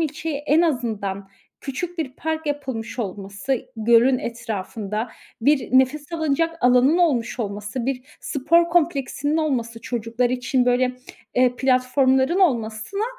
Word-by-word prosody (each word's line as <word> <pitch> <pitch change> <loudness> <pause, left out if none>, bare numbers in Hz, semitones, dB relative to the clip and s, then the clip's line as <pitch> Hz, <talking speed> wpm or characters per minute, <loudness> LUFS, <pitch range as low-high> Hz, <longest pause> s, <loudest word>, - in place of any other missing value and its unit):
ilçeye 310 -1 -2
en 300 +2 +2
azından 215 - -2 0.3
küçük 340 +6 -5
bir 270 -5 -2
park 320 0 -3
yapılmış 260 -5 -4
olması, 200 +3 -4 0.2
-gölün 235 +3 +4
etrafında 220 -1 -4 0.3
bir 280 +2 +2
nefes 290 +4 0
alınacak 330 +1 0
alanının 250 +6 +4
olmuş 260 -8 +1
olması, 210 +3 -4
bir 265 -2 -2 0.2
spor 335 +5 +2
kompleksinin 300 -3 +1
olması 240 -8 -1
çocuklar 235 +1 -1
için, 255 0 +1
böyle, 250 +1 +2 0.4
eee, 250 0 +3
platformların 260 +4 +2
olmasına 235 - 0
255 Hz, 120 wpm, -22 LUFS, 230-300 Hz, 0.4 s, gölün